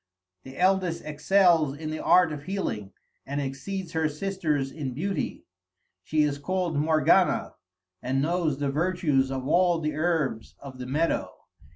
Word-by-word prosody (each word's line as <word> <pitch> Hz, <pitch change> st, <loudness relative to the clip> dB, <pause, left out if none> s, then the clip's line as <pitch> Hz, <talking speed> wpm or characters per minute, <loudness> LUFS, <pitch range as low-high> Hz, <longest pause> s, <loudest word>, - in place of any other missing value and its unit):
The 130 Hz, +4 st, -12 dB
eldest 185 Hz, -2 st, +1 dB
excels 155 Hz, -1 st, +3 dB
in 155 Hz, 0 st, -5 dB
the 155 Hz, -, -5 dB
art 180 Hz, -3 st, +5 dB
of 145 Hz, -1 st, -8 dB
healing, 110 Hz, -, -3 dB, 0.3 s
and 140 Hz, +1 st, -4 dB
exceeds 165 Hz, +7 st, -4 dB
her 160 Hz, -1 st, 0 dB
sisters 155 Hz, -5 st, -2 dB
in 135 Hz, -5 st, -5 dB
beauty. 195 Hz, +7 st, -3 dB, 0.6 s
She 155 Hz, +6 st, +1 dB
is 145 Hz, -1 st, -1 dB
called 180 Hz, +1 st, -1 dB
Morgana, 155 Hz, +4 st, +3 dB, 0.5 s
and 130 Hz, +2 st, -1 dB
knows 160 Hz, -1 st, 0 dB
the 140 Hz, -1 st, -1 dB
virtues 150 Hz, -4 st, +1 dB
of 130 Hz, -1 st, -4 dB
all 175 Hz, +1 st, +3 dB
the 150 Hz, -1 st, -2 dB
herbs 155 Hz, -9 st, -1 dB
of 135 Hz, -2 st, -11 dB
the 125 Hz, -, -6 dB
meadow. 155 Hz, +6 st, -1 dB
155 Hz, 150 wpm, -26 LUFS, 140-175 Hz, 0.6 s, art